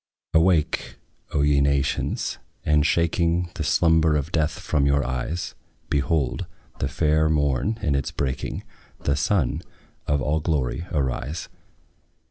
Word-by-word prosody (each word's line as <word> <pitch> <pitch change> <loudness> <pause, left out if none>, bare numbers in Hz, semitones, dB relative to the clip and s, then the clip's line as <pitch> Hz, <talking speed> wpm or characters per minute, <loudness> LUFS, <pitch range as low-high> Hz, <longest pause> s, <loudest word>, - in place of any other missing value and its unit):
Awake, 80 -1 +2 0.4
O 70 -2 +1
ye 75 -1 +4
nations, 70 -1 0 0.3
and, 75 -1 +4
shaking 85 +1 +1
The 80 - -3
slumber 80 0 +3
of 75 +3 -1
death 80 -1 +1
from 70 -1 +1
your 70 0 +2
eyes, 65 +7 -3 0.4
Behold 75 -1 0 0.3
the - - 0
fair 80 0 +2
morn 75 - +1
in 75 - +2
its 70 -1 0
breaking, 65 -2 -3 0.4
The 70 - +2
SUN 75 0 +1 0.5
of 70 0 +2
all 75 +3 +1
glory 75 +1 -1
arise. 70 +1 -2
75 Hz, 125 wpm, -24 LUFS, 70-80 Hz, 0.5 s, ye